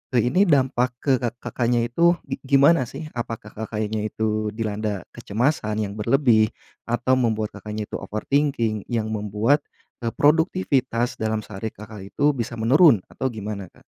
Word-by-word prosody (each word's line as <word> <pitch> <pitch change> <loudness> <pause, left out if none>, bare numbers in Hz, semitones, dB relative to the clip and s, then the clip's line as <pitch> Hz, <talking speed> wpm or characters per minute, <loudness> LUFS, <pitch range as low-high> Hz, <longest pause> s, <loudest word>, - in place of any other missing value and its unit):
eee, 120 +1 +3
ini 195 +4 +4
dampak 130 -4 +3
ke 140 - +2
kak 120 -1 -2
Kakaknya 120 -1 0
itu 170 +9 +3
gi 135 - -5 0.2
gimana 140 -2 +5
sih? 155 - -7
Apakah 115 -3 -6
kakaknya 110 0 -3
itu 110 0 -1
dilanda 105 -3 -2
kecemasan 115 0 -1
yang 100 -1 -4
berlebih 115 -2 +4 0.4
atau 120 +2 +1
membuat 110 -3 0
Kakaknya 105 0 -5
itu - - -3
overthinking 115 -2 -1
yang 110 -2 -2
membuat, 105 +7 +1 0.4
eee, 115 -2 -3
produktivitas 145 -6 +1
dalam 110 -1 -1
sehari 110 +1 -6
Kakak 105 -2 -10
itu 145 +1 +4
bisa 120 -4 -4
menurun 120 - +5
atau 130 - -2
gimana, 105 -4 -5
Kak? - - -23
115 Hz, 150 wpm, -23 LUFS, 110-130 Hz, 0.4 s, gimana